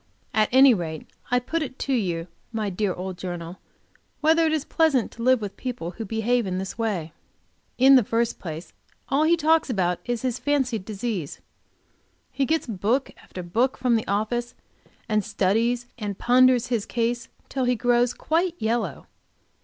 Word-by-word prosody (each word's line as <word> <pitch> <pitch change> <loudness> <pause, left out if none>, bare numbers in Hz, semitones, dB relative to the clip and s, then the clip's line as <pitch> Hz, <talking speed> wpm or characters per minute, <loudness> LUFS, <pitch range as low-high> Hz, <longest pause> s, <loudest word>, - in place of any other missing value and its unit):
At 215 0 +3
any 260 0 +7
rate 160 -6 -4 0.2
I 245 - +3
put 320 +7 -2
it 265 -3 -5
to 275 - -2
you, 175 -8 -1 0.3
my 215 -3 -2
dear 195 +1 0
old 185 0 -6
journal, 175 -1 -6 0.6
whether 320 +1 +4
it - - +1
is 310 -2 -1
pleasant 300 -8 +2
to 230 - -10
live 255 0 +4
with 200 -2 -5
people 240 -10 -5
who 220 +5 -6
behave 225 +2 0
in 185 0 -2
this 190 0 -4
way? 195 -9 -2 0.6
In 270 +2 +7
the 250 - +4
first 230 +2 -1
place 160 0 -7 0.4
all 285 +3 +3
he 340 +2 +4
talks 320 -1 +3
about 180 -6 0
is 240 -1 -2
his 250 -1 -1
fancied 260 -8 0
disease. 205 -7 -4 0.9
He 275 -2 0
gets 320 +1 +1
book 225 +5 0
after 180 - -8
book 235 +10 0
from 250 -2 +2
the 220 - -1
office 235 +4 -1 0.5
and 215 -1 +1
studies 220 +5 +1
and 205 -3 -4
ponders 250 0 +4
his 230 -5 -1
case 235 0 -1 0.2
till 265 -2 -1
he 250 0 +2
grows 245 +1 +2
quite 335 +2 0
yellow. 220 - -2
235 Hz, 170 wpm, -25 LUFS, 200-255 Hz, 0.9 s, any